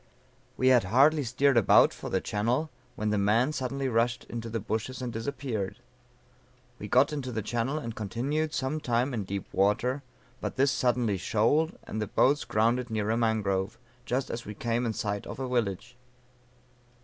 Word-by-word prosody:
"We 130 - +4
had 125 -5 +5
hardly 140 +9 +4
steered 130 +2 +2
about 110 - +6
for - - -7
the - - +1
channel, 120 +9 -1 0.2
when 105 0 -1
the 105 - +1
man 115 +8 +2
suddenly 135 -1 -2
rushed 120 0 +1
into 115 -1 -6
the 115 0 -2
bushes 110 +4 -3
and 125 -2 -4
disappeared. 115 -4 -3 1.0
We - - -6
got 140 +4 +4
into 135 -4 -4
the 110 -2 -3
channel, 120 +6 -1
and 115 -7 -5
continued 135 +9 -2
some 145 +2 -2
time 125 0 0
in 105 -5 -2
deep 100 0 -4
water, 115 +8 +1 0.4
but - - -4
this 135 +2 +3
suddenly 120 -5 +1
shoaled, 115 - +1
and 110 - -5
the 105 - -2
boats 135 +5 +2
grounded 120 +2 +1
near 110 -1 -1
a - - +2
mangrove, 105 -4 0 0.3
just 125 +2 -2
as 120 - -4
we 105 - -8
came 120 +2 -1
in 110 - -1
sight 100 -1 -3
of - - -6
a 130 - -2
village. 120 -1 -2
120 Hz, 175 wpm, -28 LUFS, 110-130 Hz, 1.0 s, about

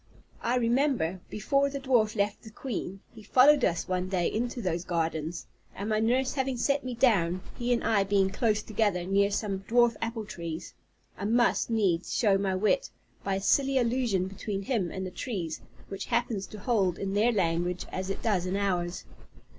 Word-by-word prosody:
I 240 - 0
remember, 240 - +1
before 275 +7 +1
the 280 0 -5
dwarf 240 -5 +2
left 205 0 0
the 220 - -11
queen, 210 -5 -5
he 225 - -12
followed 265 +5 +5
us 170 -2 +1
one 185 0 -1
day 180 -3 0
into 240 +3 -2
those 175 -5 -2
gardens, 165 -1 -2 0.3
and 200 +2 -4
my 215 0 +2
nurse 250 +4 +1
having 265 -2 -1
set 280 +4 +1
me 255 -1 -4
down, 185 -8 +2
he 240 0 -2
and 240 - +1
I 210 -3 +3
being 195 -1 +2
close 215 -1 +1
together, 205 -5 0
near 200 +2 +3
some 200 -1 -2
dwarf 240 0 +4
apple 225 -1 -3
trees, 170 -3 -6 0.5
I 200 - -3
must 235 +3 +2
needs 195 -7 +1
show 205 -6 +3
my 195 -1 0
wit, 215 - +1 0.3
by 195 - 0
a 195 - -2
silly 270 +6 +2
allusion 235 -6 +1
between 195 +1 -4
him 195 -5 -1
and 190 +2 -5
the 185 - -5
trees, 180 -8 -4 0.3
which 195 0 -5
happens 230 -5 -1
to 215 - -10
hold 200 -5 +1
in 195 0 -3
their 215 +4 +3
language 175 -3 0
as 185 +1 -4
it 195 - -4
does 190 -5 +1
in 185 - -1
ours. 180 -3 -1
205 Hz, 185 wpm, -28 LUFS, 185-240 Hz, 0.5 s, followed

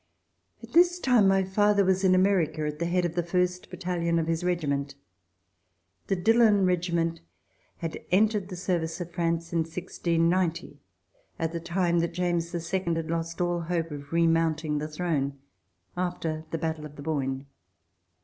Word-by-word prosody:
At - - -12
this 350 +1 +5
time 250 - +4
my 195 0 +4
father 200 +1 +3
was 190 +1 +2
in 185 -1 +5
America, 175 -5 +2
at 150 0 -4
the 170 - 0
head 180 +1 +1
of 170 - -2
the 175 - 0
first 180 +1 -1
battalion 175 -2 -1
of 165 - +1
his 165 +1 -1
regiment. 140 -6 -1 1.1
The 195 - +1
Dillon 215 0 +4
Regiment 170 -2 0 0.6
had 165 -1 -5
entered 205 0 +2
the 185 - -6
service 175 -2 -2
of 175 -1 -6
France 170 0 -1
in 170 - +2
1690, 170 +1 -1 0.6
at 165 -1 -1
the 170 - -3
time 170 0 +1
that 170 0 -1
James 175 -2 0 0.2
II 190 - +3 0.2
had 165 0 -3
lost 165 +1 -3
all 175 0 +1
hope 165 -1 -2
of 145 -1 -8
re 170 0 +3
mounting 160 -2 +1
the 150 - -3
throne, 150 -4 -2 0.6
after 170 -3 -3
the 165 - -2
battle 160 -1 -3
of 150 - -17
the 145 - -9
Boyne. 135 -3 -2
170 Hz, 165 wpm, -27 LUFS, 160-180 Hz, 1.1 s, this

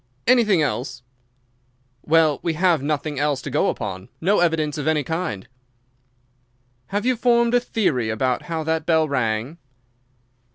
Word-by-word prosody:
"Anything 220 -9 +4
else?" 125 -3 -3 1.0
"Well, 155 -2 +3
we 165 - -1
have 170 -2 +2
nothing 145 0 -2
else 145 -2 0
to - - -5
go - - +2
upon—no 125 - -2
evidence 155 -4 0
of 150 - -3
any 155 -2 +2
kind." 150 - -4 1.4
"Have 205 +3 -2
you 255 0 +2
formed 235 0 +2
a 245 - +5
theory 155 - -1
about 125 +4 0
how 165 -1 -2
that 160 0 -2
bell 160 -2 +3
rang?" 125 +2 -2
155 Hz, 135 wpm, -22 LUFS, 135-180 Hz, 1.4 s, a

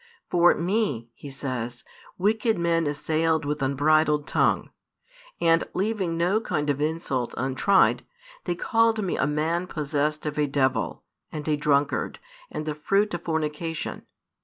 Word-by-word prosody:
For 175 0 +5
Me, 170 - -1
He 140 - -10
says, 125 -3 -4 0.3
wicked 215 +3 +1
men 170 -2 +1
assailed 155 +2 0
with 150 0 -2
unbridled 150 +2 +2
tongue; - - +1 0.7
and, 165 0 +4
leaving 195 -4 -1
no 180 +6 +2
kind 150 -8 0
of 140 0 -3
insult 150 -5 -1
untried, 135 +10 +3 0.4
they 175 - -1
called 225 +4 +2
Me 185 - -1
a - - +1
man 160 +4 0
possessed 150 -1 -1
of 150 0 -2
a 150 - +2
devil, 135 -2 0 0.3
and 150 -1 -6
a 155 - +3
drunkard, 145 -1 +1 0.3
and 155 - -5
the 155 - -2
fruit 195 +7 +1
of 175 - -3
fornication. 160 0 -3
155 Hz, 140 wpm, -25 LUFS, 145-175 Hz, 0.7 s, For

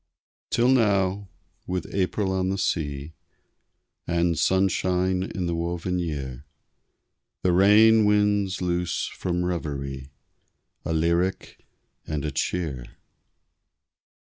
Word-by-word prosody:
Till 120 - +2
now, 100 -5 +2 0.4
with 90 -2 -2
April 95 +1 0
on 95 0 0
the 95 - -1
sea, 75 -5 -2 0.9
And 85 0 +1
sunshine 95 +1 +1
in 95 -1 -3
the 85 - -1
woven 85 +2 -2
year, 70 -6 -4 1.0
The 90 - +3
rain 105 +4 +6
winds 105 -2 +2
loose 90 -1 -1
from 90 -1 -3
reverie 70 -6 -4 0.8
A - - -2
lyric 85 +3 -1 0.4
and 75 -2 -3
a 75 - -2
cheer. 70 -3 -2
90 Hz, 100 wpm, -25 LUFS, 80-95 Hz, 1.0 s, rain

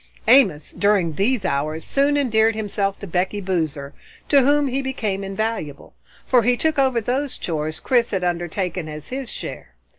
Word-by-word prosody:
Amos, 205 - +4
during 200 -5 +1
these 205 - 0
hours, 155 +1 -1
soon 285 +1 +2
endeared 225 -5 +2
himself 200 -2 -2
to - - -8
Becky 185 +3 -1
Boozer, 160 -7 -2 0.4
to 280 -2 +6
whom 285 +2 +3
he 265 +1 -1
became 220 -7 -3
invaluable, 195 -7 -4 0.3
for 250 -2 +4
he 245 +2 +2
took 315 +1 0
over 260 -3 +3
those 255 +5 -2
chores 155 -2 -3
Chris 240 -2 +2
had 190 -2 -2
undertaken 175 -1 -2
as 150 0 -8
his 260 -1 -5
share. - - -8
205 Hz, 160 wpm, -22 LUFS, 170-255 Hz, 0.4 s, to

